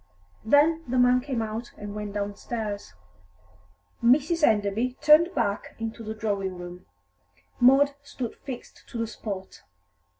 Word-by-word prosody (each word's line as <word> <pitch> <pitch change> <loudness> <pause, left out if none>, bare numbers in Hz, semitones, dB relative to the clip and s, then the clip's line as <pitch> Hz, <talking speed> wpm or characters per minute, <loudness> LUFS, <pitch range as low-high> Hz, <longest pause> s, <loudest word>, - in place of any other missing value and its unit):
Then 300 +7 +4
the 255 +1 -1
man 250 0 +5
came 255 -4 -2
out 220 +2 -5
and 205 0 -7
went 210 -1 -5
downstairs. 205 - -4 1.1
Mrs. 295 +7 +4
Enderby 220 +1 +2
turned 310 +4 +5
back 200 0 -1
into 225 +1 -5
the 220 0 -5
drawing 200 -4 -2
room. 175 - -9 0.7
Maud 275 +3 +6
stood 260 -4 -6
fixed 255 -3 -9
to - - -7
the 230 - 0
spot. 200 -4 -7
230 Hz, 130 wpm, -26 LUFS, 205-265 Hz, 1.1 s, Maud